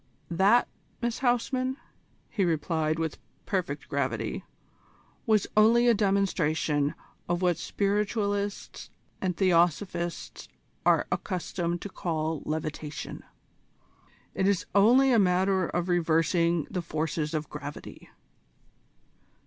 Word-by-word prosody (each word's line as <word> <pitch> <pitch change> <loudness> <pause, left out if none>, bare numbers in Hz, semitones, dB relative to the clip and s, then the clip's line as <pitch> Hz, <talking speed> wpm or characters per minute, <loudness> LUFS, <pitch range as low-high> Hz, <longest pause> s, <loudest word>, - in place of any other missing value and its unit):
"That, 195 +8 +4 0.3
Miss 235 -1 -2
Huysman," 255 +1 0 0.5
he 205 - 0
replied 160 -1 0
with 160 -2 -3 0.3
perfect 160 -7 -2
gravity, 120 - -2 0.8
"was 215 -3 +3
only 230 +3 +5
a 240 - +6
demonstration 165 -8 +1 0.3
of 175 +1 0
what 175 -3 +2
Spiritualists 205 0 -2 0.3
and 180 -3 -1
Theosophists 175 -1 0 0.4
are - - +4
accustomed 175 -2 -2
to 200 - -5
call 160 -4 -2
levitation. 155 0 -5 1.1
It 190 - +1
is 200 -3 +1
only 245 +7 +5
a 235 - +5
matter 190 -1 +2
of 175 0 -2
reversing 170 -1 +2
the 180 - -2
force 160 -1 -3 0.2
of 155 -1 -2
gravity." 150 0 -9
180 Hz, 100 wpm, -28 LUFS, 160-200 Hz, 1.1 s, a